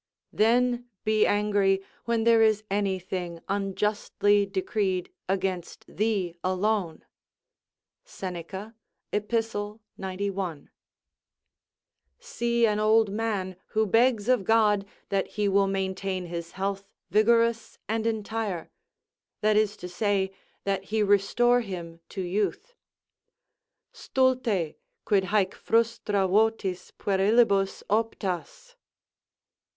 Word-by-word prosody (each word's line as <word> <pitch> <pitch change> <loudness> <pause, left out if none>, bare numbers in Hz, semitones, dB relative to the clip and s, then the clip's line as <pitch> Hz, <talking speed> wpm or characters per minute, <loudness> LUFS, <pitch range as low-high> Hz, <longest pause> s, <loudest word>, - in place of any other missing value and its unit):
["Then 245 +2 +2
be 215 -1 +3
angry, 205 -2 +2 0.2
when 230 -1 +1
there 230 0 +5
is 215 -1 +3
anything 185 -3 -2
unjustly 205 +1 +1
decreed 190 -1 -1 0.2
against 190 -2 -2
thee 200 -5 -1
alone." 185 -2 -1 1.0
Seneca, 190 - -7 0.4
Ep., 210 +1 -2 0.7
91.] 190 -4 -4 1.5
See 235 - 0
an 210 -1 +1
old 215 -1 +4
man 205 -4 -2
who 220 0 +1
begs 225 +1 +3
of 250 -5 +3
God 210 -1 +3 0.2
that 195 -1 0
he 210 -1 +2
will 195 0 +3
maintain 190 -1 -2
his 170 -1 -6
health 195 0 -2 0.3
vigorous 230 +2 +3
and 225 +1 -1
entire; 220 -4 -3 0.7
that 215 0 +3
is 215 0 +2
to 180 - -7
say, 190 +1 0 0.3
that 195 -1 -1
he 215 +1 0
restore 210 +5 +3
him 170 -6 -7
to 195 - -5
youth: 205 - -2 1.2
"Stulte, 250 - 0 0.3
quid 195 -2 +2
haec 195 -1 +1
frustra 225 -4 +1
votis 200 -2 +1
puerilibus 200 0 +2
optas?" 225 - -2
205 Hz, 100 wpm, -27 LUFS, 190-225 Hz, 1.5 s, there